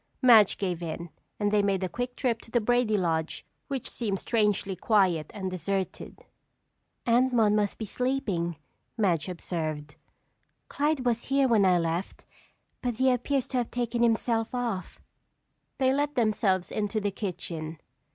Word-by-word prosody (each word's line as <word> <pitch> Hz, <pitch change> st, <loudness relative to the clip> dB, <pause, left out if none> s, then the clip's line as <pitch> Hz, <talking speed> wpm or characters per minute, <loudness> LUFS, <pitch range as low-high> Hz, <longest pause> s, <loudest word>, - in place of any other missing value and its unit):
Madge 230 Hz, -6 st, +6 dB
gave 180 Hz, -4 st, -2 dB
in 170 Hz, 0 st, -5 dB, 0.3 s
and 205 Hz, -1 st, +1 dB
they 210 Hz, -1 st, +4 dB
made 195 Hz, -2 st, 0 dB
a -, -, +1 dB
quick 245 Hz, +6 st, -4 dB
trip 235 Hz, -4 st, -1 dB
to -, -, -15 dB
the 240 Hz, -, +2 dB
Brady 235 Hz, -1 st, +2 dB
lodge 165 Hz, -3 st, -1 dB, 0.2 s
which 270 Hz, -4 st, -4 dB
seemed 205 Hz, -5 st, -3 dB
strangely 210 Hz, -4 st, 0 dB
quiet 185 Hz, -8 st, +2 dB
and 190 Hz, -3 st, -4 dB
deserted. 190 Hz, +2 st, -4 dB, 0.8 s
"Aunt 245 Hz, +2 st, +3 dB
Maude 220 Hz, -3 st, +4 dB
must 210 Hz, -1 st, +1 dB
be 220 Hz, -, -4 dB
sleeping," 210 Hz, -9 st, -1 dB, 0.4 s
Madge 185 Hz, -6 st, +1 dB
observed. 155 Hz, -4 st, -4 dB, 0.7 s
"Clyde 290 Hz, -2 st, 0 dB
was 235 Hz, -1 st, 0 dB
here 275 Hz, 0 st, +3 dB
when 220 Hz, -5 st, +4 dB
I 180 Hz, -1 st, +5 dB
left 170 Hz, +2 st, -3 dB, 0.6 s
but 245 Hz, -2 st, -1 dB
he 260 Hz, +2 st, +3 dB
appears 260 Hz, +2 st, 0 dB
to 260 Hz, -, -1 dB
have 240 Hz, -2 st, 0 dB
taken 240 Hz, -1 st, -2 dB
himself 230 Hz, 0 st, +1 dB
off." 230 Hz, -7 st, -3 dB, 0.8 s
They 260 Hz, -1 st, +3 dB
let 290 Hz, +1 st, 0 dB
themselves 210 Hz, -6 st, +1 dB
into 215 Hz, +1 st, -1 dB
the 205 Hz, -1 st, -1 dB
kitchen. 165 Hz, -5 st, -5 dB
210 Hz, 150 wpm, -28 LUFS, 185-245 Hz, 0.8 s, Madge